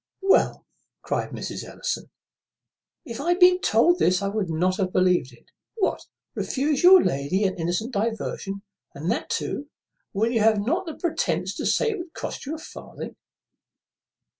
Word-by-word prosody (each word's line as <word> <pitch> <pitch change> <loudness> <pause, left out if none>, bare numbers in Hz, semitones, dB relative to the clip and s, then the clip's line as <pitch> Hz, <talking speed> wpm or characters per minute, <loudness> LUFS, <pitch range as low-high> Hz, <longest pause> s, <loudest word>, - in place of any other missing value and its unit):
"Well," 390 - +3 0.4
cries - - -2
Mrs. - - -5
Ellison, - - -4 1.0
"if 235 +3 -6
I 330 - -2
had 355 - -5
been 365 0 +6
told 335 +11 +4
this, 185 +2 +2
I 200 - 0
would 200 -3 -2
not 180 +3 +1
have 190 -3 -1
believed 180 -8 +2
it. 120 - -21 0.2
What, 430 - -1 0.3
refuse 280 +1 -1
your 370 +1 +8
lady 140 +9 0
an 190 -2 +1
innocent 180 +9 -2
diversion, 200 -2 -3 0.3
and 160 +5 -2
that - - -2
too 290 +1 -3 0.4
when 220 +3 0
you 235 - +1
have 215 -1 +4
not 345 +8 0
the 320 - -5
pretence 345 -3 -1
to - - -2
say 465 -2 +2
it 415 - -4
would 345 -1 -8
cost - - -6
you 310 - -3
a - - -7
farthing?" 315 - -9
225 Hz, 165 wpm, -25 LUFS, -, 1.0 s, your